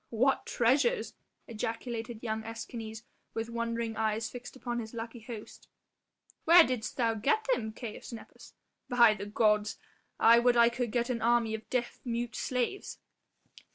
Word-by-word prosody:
"What 255 +4 +1
treasures," 275 - +2 0.3
ejaculated 230 0 -4
young 220 -1 -2
Escanes 225 0 -7 0.3
with 225 +1 -3
wondering 230 -1 -2
eyes 220 0 -1
fixed 245 +1 -9
upon 240 -2 -3
his 220 0 -7
lucky 230 +1 -6
host; 225 -1 -10 0.8
"where 340 +1 +9
didst 250 -6 -3 0.2
get 365 - +2
them, 220 - -2
Caius 220 +1 -8
Nepos? 230 -2 -12 0.3
By 240 -3 +6
the 200 -1 -6
gods, 210 0 +2 0.4
I 230 +1 +7
would 240 0 +3
I 235 0 +7
could 240 0 -2
get 240 +1 0
an 235 -2 -2
army 235 -1 +2
of 220 0 -6
deaf 245 -2 -2
mute 235 -1 -3
slaves." 255 +10 -2
235 Hz, 145 wpm, -30 LUFS, 220-245 Hz, 0.8 s, where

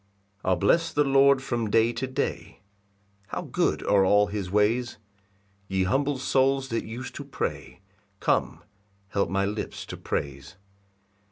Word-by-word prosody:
1 - - -2
I'll 95 - +4
bless 165 - +2
the 150 - +2
Lord 135 -1 +4
from 120 -4 -2
day 115 +2 +3
to 125 +3 -3
day; 130 - -4 0.7
How - - -4
good - - 0
are 100 -1 +4
all 105 +2 +5
his 100 -2 -4
ways! 110 +5 +1 0.7
Ye 95 -1 0
humble 135 +8 +1
souls 135 +1 +1
that 115 - -2
use 120 +3 -6
to - - -7
pray, - - -5 0.4
Come, - - 0 0.5
help 100 0 0
my 100 0 +1
lips 105 +2 -4
to - - -8
praise. 70 -1 -4
115 Hz, 150 wpm, -26 LUFS, 100-130 Hz, 0.7 s, all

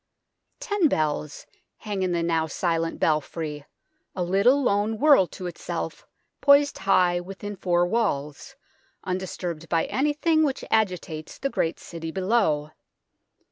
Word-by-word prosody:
Ten 410 -5 +1
bells 150 - -2 0.3
hang 205 -3 -4
in 185 -1 0
the 170 -1 0
now 165 -1 +1
silent 165 0 -1
belfry, 150 -1 -1 0.5
a 180 - -1
little 200 +10 +3
lone 210 -1 +1
world 280 - +5
to 185 - -7
itself 175 -1 -5 0.3
poised 285 0 +5
high 180 -2 +3
within 195 +3 -7
four 175 -2 +1
walls, 175 - -2 0.5
undisturbed 180 -3 -4
by 165 -1 +2
anything 300 +3 +1
which 275 -3 -1
agitates 180 -7 -1
the 275 - -2
great 165 - -1
city 165 -1 -7
below. 185 -5 +1
185 Hz, 125 wpm, -25 LUFS, 165-220 Hz, 0.5 s, world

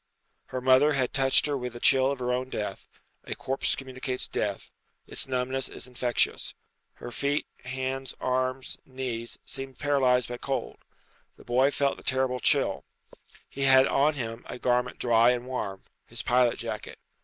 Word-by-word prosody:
Her 130 - -4
mother 130 +4 +5
had 130 -3 0
touched 135 -1 +4
her 145 -1 +1
with 125 -2 -4
the 120 - -8
chill 130 +2 +5
of 140 - -2
her 125 0 -1
own 130 +1 -2
death 105 -5 -4 0.4
a - - -3
corpse 135 +1 0
communicates 130 -1 -3
death; 100 -2 -3 0.3
its - - -2
numbness 130 +1 -1
is - - -7
infectious. 125 -1 0 0.4
Her - - -9
feet, 140 +4 0 0.2
hands, 130 +1 -3
arms, 130 +1 -1
knees, 125 -3 -4
seemed 135 -1 -5
paralyzed 130 -4 +2
by 120 - -5
cold. 135 +2 -3 0.6
The - - -16
boy 130 +3 +3
felt 140 -1 0
the - - -13
terrible 130 -1 0
chill. - - +2 0.6
He 140 - -8
had 135 -1 +7
on 145 +3 +3
him 115 -3 -5
a - - -5
garment 125 0 +1
dry 115 0 +4
and 120 0 -4
warm 100 -7 -4 0.2
his - - -5
pilot 125 -1 +3
jacket. - - -6
130 Hz, 165 wpm, -28 LUFS, 125-135 Hz, 0.6 s, had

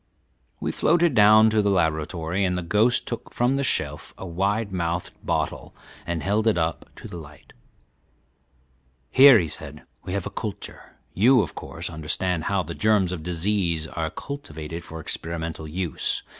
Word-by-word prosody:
We - - -2
floated 170 -1 +2
down 110 0 +6
to 110 0 +3
the 100 - +1
laboratory, 85 +1 0
and 90 -1 +1
the 90 - -3
ghost 110 +8 +2
took 120 - -6
from 125 +3 +1
the 140 - 0
shelf 75 - -2
a - - -7
wide 100 +4 -1
mouthed 85 -1 -2
bottle - - -2 0.3
and 85 -2 -2
held 105 +3 +1
it 110 - +3
up 80 -1 -2
to - - -10
the 85 - -8
light. 75 -2 -14 1.6
"Here," 135 -2 +9
he 85 -6 0
said, 75 0 -7 0.2
"we 90 - -5
have 100 -2 -2
a - - -5
culture. - - -7 0.2
You, 120 +3 +5
of - - -6
course, 85 +1 -6
understand 80 +2 -2
how 100 -2 +1
the 85 +1 -6
germs 105 -3 +2
of 90 -3 -4
disease 85 -1 0
are 80 +1 -3
cultivated 85 - -7
for 80 0 -9
experimental 80 0 -5
use. 85 -1 -2
90 Hz, 165 wpm, -24 LUFS, 80-105 Hz, 1.6 s, Here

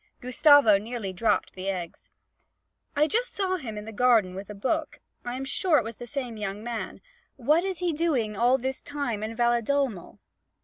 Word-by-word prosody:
Gustavo 250 -4 +5
nearly 215 -3 -5
dropped 210 +3 0
the 190 +1 -4
eggs. 180 -3 -6 0.9
'I 295 +1 +4
just 475 +9 -1
saw 375 -2 0
him 225 -10 -7
in 210 - -6
the 225 - -7
garden 225 -5 +3
with 195 +2 -8
a 210 - -7
book 305 +9 -2 0.2
I 245 0 -4
am 265 +1 -4
sure 365 +1 +2
it - - +2
was 225 0 -7
the 240 - -8
same 250 -3 -4
young 205 0 -4
man. 235 -1 -5 0.3
What 300 +7 +2
is 380 -2 -2
he 350 -1 -1
doing 280 -10 0
all 245 +5 +3
this 265 +1 -4
time 280 -7 -3
in 220 +1 -4
Valedolmo?' 240 -3 0
240 Hz, 185 wpm, -27 LUFS, 215-290 Hz, 0.9 s, Gustavo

